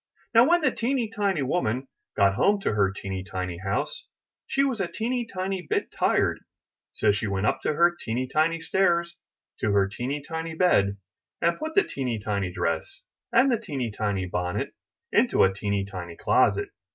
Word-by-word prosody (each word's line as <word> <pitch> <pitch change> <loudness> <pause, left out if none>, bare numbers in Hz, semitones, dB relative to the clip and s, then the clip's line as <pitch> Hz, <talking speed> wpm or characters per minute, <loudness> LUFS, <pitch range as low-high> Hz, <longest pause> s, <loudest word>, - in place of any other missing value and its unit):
Now 235 +5 +6
when 345 0 +4
the 280 -4 +3
teeny 235 -2 -1
tiny 195 -8 +1
woman 130 -3 -1 0.3
got 100 -1 +5
home 200 - +3
to - - 0
her 100 -2 +2
teeny 95 -1 -5
tiny 90 -2 -4
house, - - -3 0.4
she 275 - +2
was 260 -7 0
a 185 - 0
teeny 230 +7 -2
tiny 190 0 -2
bit 175 - -2
tired; - - +1 0.5
so 105 - +2
she 105 +1 -1
went 100 0 -1
up - - +1
her 170 +3 +3
teeny 125 +3 -2
tiny 160 +4 +1
stairs 170 -1 +1 0.4
to 105 - +1
her 100 -1 +4
teeny 130 +8 -4
tiny 160 0 -4
bed, 100 - +3 0.4
and 170 0 +1
put 315 +1 -4
the 405 - +6
teeny 125 - -3
tiny 100 -3 -2
dress 85 -3 -2 0.3
and 260 +3 +5
the 235 - +2
teeny 140 - -3
tiny 100 -3 -1
bonnet 90 0 -2 0.4
into - - +4
a 95 - +4
teeny 100 0 -1
tiny 90 -4 -7
closet. - - +2
135 Hz, 175 wpm, -26 LUFS, -, 0.5 s, Now